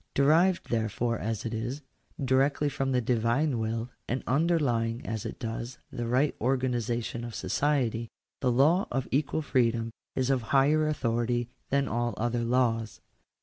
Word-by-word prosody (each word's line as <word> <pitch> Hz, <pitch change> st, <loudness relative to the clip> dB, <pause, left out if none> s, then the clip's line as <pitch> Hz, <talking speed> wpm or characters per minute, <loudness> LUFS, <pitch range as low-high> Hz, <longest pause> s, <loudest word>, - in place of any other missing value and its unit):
Derived, 165 Hz, +6 st, +3 dB
therefore, 115 Hz, +1 st, 0 dB
as 110 Hz, +1 st, -3 dB
it 115 Hz, -, -3 dB
is, 120 Hz, +6 st, -3 dB, 0.4 s
directly 140 Hz, +3 st, +2 dB
from 135 Hz, -1 st, -1 dB
the 125 Hz, -1 st, +2 dB
Divine 120 Hz, +4 st, +1 dB
will, 115 Hz, +2 st, -2 dB, 0.2 s
and 125 Hz, +2 st, -1 dB
underlying 130 Hz, -6 st, +1 dB
as 110 Hz, -2 st, -3 dB
it -, -, -7 dB
does 115 Hz, +2 st, -5 dB
the 120 Hz, -1 st, -3 dB
right 130 Hz, +5 st, +2 dB
organization 120 Hz, -2 st, -1 dB
of 120 Hz, -1 st, -6 dB
society, 120 Hz, -6 st, 0 dB, 0.3 s
the 125 Hz, -, +2 dB
law 155 Hz, +10 st, +4 dB
of 130 Hz, +1 st, -2 dB
equal 150 Hz, +3 st, 0 dB
freedom 115 Hz, -4 st, +1 dB, 0.2 s
is 130 Hz, 0 st, +1 dB
of 130 Hz, -2 st, +2 dB
higher 140 Hz, +6 st, +3 dB
authority 120 Hz, -4 st, 0 dB, 0.2 s
than 140 Hz, 0 st, +2 dB
all 120 Hz, 0 st, -1 dB
other 120 Hz, +1 st, 0 dB
laws. 115 Hz, -2 st, +1 dB
120 Hz, 145 wpm, -28 LUFS, 115-135 Hz, 0.4 s, law